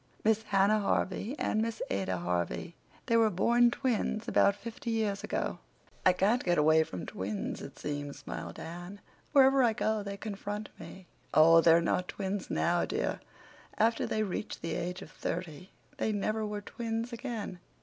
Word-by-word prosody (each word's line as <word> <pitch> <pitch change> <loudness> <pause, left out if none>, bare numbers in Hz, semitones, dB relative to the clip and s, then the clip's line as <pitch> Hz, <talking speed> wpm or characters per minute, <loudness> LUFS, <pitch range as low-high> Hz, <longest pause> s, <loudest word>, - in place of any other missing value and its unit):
Miss 220 0 +3
Hannah 200 0 +3
Harvey 205 +4 -1
and 215 - 0
Miss 225 0 -2
Ada 95 -1 -1
Harvey. 85 -7 -2 0.3
They 230 - +3
were 225 -1 +5
born 235 +5 +4
twins 235 -3 -1
about 200 -4 +4
fifty 230 +4 -7
years 215 -3 0
ago." - - -2 0.4
"I 185 - +7
can't 205 +7 +2
get 175 -1 +2
away 155 +1 +5
from 90 - -7
twins, 100 +2 -4
it - - -9
seems," 145 -1 -4
smiled 145 - -7
Anne. 175 +4 -8 0.3
"Wherever 270 -1 +6
I 235 -3 +4
go 220 0 0
they 200 0 -5
confront 205 0 -5
me." 190 - -10 0.3
"Oh, 165 +2 +8
they're 165 0 +6
not 180 +2 0
twins 195 -1 -4
now, 175 0 +1
dear. 445 +4 -1 0.6
After 225 +1 +2
they 215 - 0
reached 205 -1 -4
the 165 - -2
age 180 +2 -3
of - - -13
thirty 175 0 -5 0.3
they 220 - 0
never 215 +1 -1
were 210 0 -4
twins 230 +2 -4
again. 230 -7 -5
200 Hz, 165 wpm, -31 LUFS, 170-225 Hz, 0.6 s, Oh